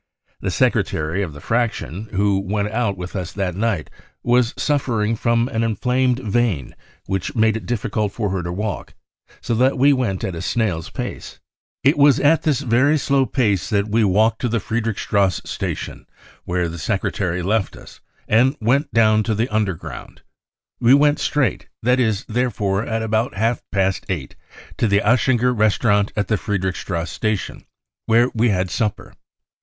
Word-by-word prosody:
The - - -2
secretary 80 +6 0
of 85 -6 -4
the 75 - -10
Fraction, 110 -2 -2
who 100 -1 +1
went 100 +2 -2
out 110 -3 -1
with 90 +2 -7
us 90 -3 -4
that 95 -3 -2
night, 100 -4 -2 0.3
was 120 0 +2
suffering 115 -7 0
from 115 +1 +1
an 115 -4 -1
inflamed 125 +3 +1
vein 105 - -1 0.3
which 95 +2 -3
made 110 -1 +3
it 110 -5 -6
difficult 110 -3 -1
for 105 -2 -2
her 95 -1 -1
to 85 0 -4
walk, 100 +2 -4 0.5
so - - -2
that 130 +4 +2
we 140 +3 +5
went 115 -8 -1
at 95 - -2
a 80 - -5
snail's 90 -6 -1
pace. - - -6 0.2
" - - -81
It 140 +2 +3
was 140 -2 +6
at 155 +3 +4
this 150 -6 +1
very 130 +6 +3
slow 140 -2 +1
pace 100 -7 0
that 100 0 0
we 110 +2 +2
walked 105 +3 +2
to 125 - 0
the 115 +1 0
Friedrichs 110 +1 -2
trasse 100 -4 +2
Station, - - -5 0.4
where 90 -1 0
tfie 85 +1 -6
secretary 85 +4 -1
left 105 +1 0
us - - -14 0.3
and 130 +6 +3
went 135 +7 +1
down 110 -1 +4
to 110 0 -1
the 115 +4 0
Underground. 105 -5 -4 0.6
We 120 +3 +6
went 145 +1 +3
straight, 135 -8 0 0.2
that 125 +2 +3
is, 110 -5 0
therefore, 110 -4 0
at 110 0 -1
about 110 +3 0
half 115 +3 0
past 95 -2 0
eight, 75 -9 -4 0.4
to 115 - +2
the 100 0 +2
Aschinger 125 +2 +3
Restaurant 105 -1 +2
at 105 -2 -1
the 110 - +1
Friedrichs 95 -3 -2
trasse 85 -2 -3
Station, 110 -3 -3 0.4
where 115 +2 +4
we 115 +1 +2
had 90 -3 0
supper. 105 -3 -2
110 Hz, 170 wpm, -21 LUFS, 95-120 Hz, 0.6 s, was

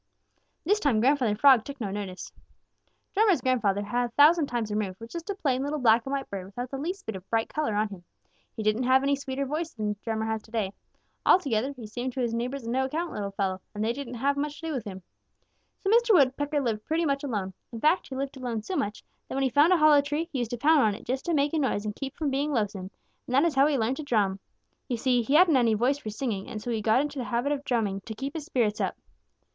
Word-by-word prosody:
This 415 +5 +3
time 270 - +2
Grandfather 250 -3 +2
Frog 260 0 +6
took 280 +2 -8
no 205 -5 -3
notice. 195 -2 -6 0.8
"Drummer's 405 -6 +4
grandfather 210 -6 +1
a 245 +1 0
thousand 305 +1 +6
times 235 -4 -2
removed 205 -3 -2
was 230 0 -10
just 340 +2 -7
a 400 - -1
plain 265 -9 0
little 290 +2 -2
black 235 -2 +3
and - - -3
white 275 -1 -2
bird 190 -2 -6
without 245 +6 -6
the 270 - -4
least 360 +7 -4
bit 220 - -4
of 190 0 -10
bright 225 -1 0
color 300 -9 -1
on 210 +1 +1
him. 190 -3 -10 0.5
He 220 - -4
didn't 215 +4 +1
have 260 +1 +4
any 280 0 +2
sweeter 275 0 -3
voice 310 +4 -3
than 210 -2 -2
Drummer 220 -1 -2
has 220 -1 -2
to 220 - -20
day. 215 -4 -2 0.5
Altogether 275 - +3
he 250 -5 -10
seemed 245 +4 -4
to 265 - -5
his 240 -2 0
neighbors 250 +3 -3
a 230 - -4
no 265 +2 +1
account 325 +6 -3
little 200 -1 -3
fellow, 195 -1 -2
and 210 - -2
they 225 +2 +1
didn't 255 -2 -6
have 280 +4 0
much 295 +1 -3
to 325 0 -5
do - - -2
with 250 -5 -4
him. 190 -3 -8 0.8
So 390 - 0
Mr. 470 -1 +5
Woodpecker 290 0 +2
lived 220 -5 -2
pretty 330 +2 +1
much 280 -1 0
alone. 205 -8 -3 0.2
In 230 - -6
fact, 315 +8 +2
he 265 - -7
lived 275 +1 -3
alone 240 -5 -4
so 375 - -4
much 210 - -2 0.3
that - - -4
when 270 - +1
he 265 - +2
found 290 +7 +4
a 365 - +6
hollow 305 -2 +6
tree 295 +3 -2
he 265 - -1
used 240 -2 -2
to 245 - -3
pound 300 +4 +4
on 215 -3 +2
it - - -12
just 260 +2 -2
to 340 -2 +1
make 285 +1 +1
a 320 - +1
noise 240 -7 0
and 210 -1 -3
keep 275 0 -6
from 300 -3 -1
being 285 +3 0
lonesome, 205 -6 -2 0.4
and 255 - -1
that 275 - +5
is 335 - +1
how 275 +1 +5
he 295 -2 +1
learned 240 +3 0
to 310 - -5
drum. 205 -7 +1 0.5
You 245 - -2
see, 245 +1 +2
he 270 +6 0
hadn't 330 -3 +6
any 230 -3 +3
voice 255 +6 +1
for 220 - -6
singing, 215 -3 -3
and 225 -4 -5
so 240 +3 -4
he 225 -2 -1
got 220 +4 +3
in 295 - 0
the 275 -4 -5
habit 240 +4 -1
of 285 -1 -2
drumming 215 -7 -1
to 220 - -5
keep 275 +5 -5
his 315 -3 -5
spirits 235 -10 0
up. - - -1
255 Hz, 260 wpm, -27 LUFS, 220-285 Hz, 0.8 s, Frog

